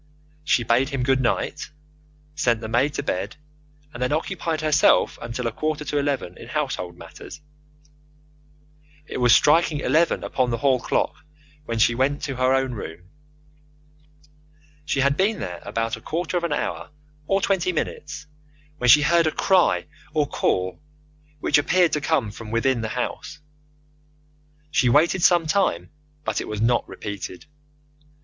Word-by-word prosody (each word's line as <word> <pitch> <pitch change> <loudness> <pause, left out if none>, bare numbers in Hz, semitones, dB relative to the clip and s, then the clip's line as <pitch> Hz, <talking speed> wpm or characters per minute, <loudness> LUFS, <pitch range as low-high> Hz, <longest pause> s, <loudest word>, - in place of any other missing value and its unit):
She 125 -5 +2
bade 120 +4 +2
him 135 -4 -2
good 135 0 +2
night, 120 - -1 0.6
sent 120 -7 +1
the 110 - -6
maid 130 +6 +1
to - - -2
bed, 95 +3 -3 0.6
and 120 - -8
then 125 - 0
occupied 160 0 -2
herself 155 -1 +3
until 120 +1 -4
a 115 - 0
quarter 155 +4 -3
to 145 - -1
eleven 140 -11 -2
in - - -10
household 85 -1 -3
matters. - - -11 1.7
It - - -6
was 120 -1 +4
striking 155 0 +3
eleven 155 +5 +2
upon 130 -2 0
the 115 - -1
hall 130 +1 +2
clock - - -1 0.5
when 115 -3 -3
she 115 +1 +4
went 135 +4 0
to 135 -4 -3
her 130 0 +2
own 135 -1 +1
room. 90 -6 -8 1.8
She 140 -3 0
had 140 +1 +3
been 205 +3 +2
there 90 -1 -5
about 115 0 -2
a 115 - -13
quarter 165 +7 -3
of 175 - 0
an 170 - -1
hour 145 - -3 0.4
or 195 - +2
twenty 190 -2 +1
minutes 150 -2 -4 0.5
when 125 - +2
she 150 +4 +8
heard 170 +1 +3
a - - +1
cry 185 0 +2 0.3
or 150 -1 +3
call, 90 -8 -1 0.6
which - - +3
appeared 175 +3 +2
to 150 - 0
come 140 -8 0
from 110 +1 -10
within 115 +2 +1
the 110 - -2
house. 125 +4 -4 1.3
She 125 -5 +3
waited 160 +7 +3
some 175 -1 +4
time, 155 - 0 0.3
but - - -1
it - - -6
was 105 -1 -4
not 120 +2 +1
repeated. 100 -3 -7
135 Hz, 155 wpm, -23 LUFS, 115-155 Hz, 1.8 s, she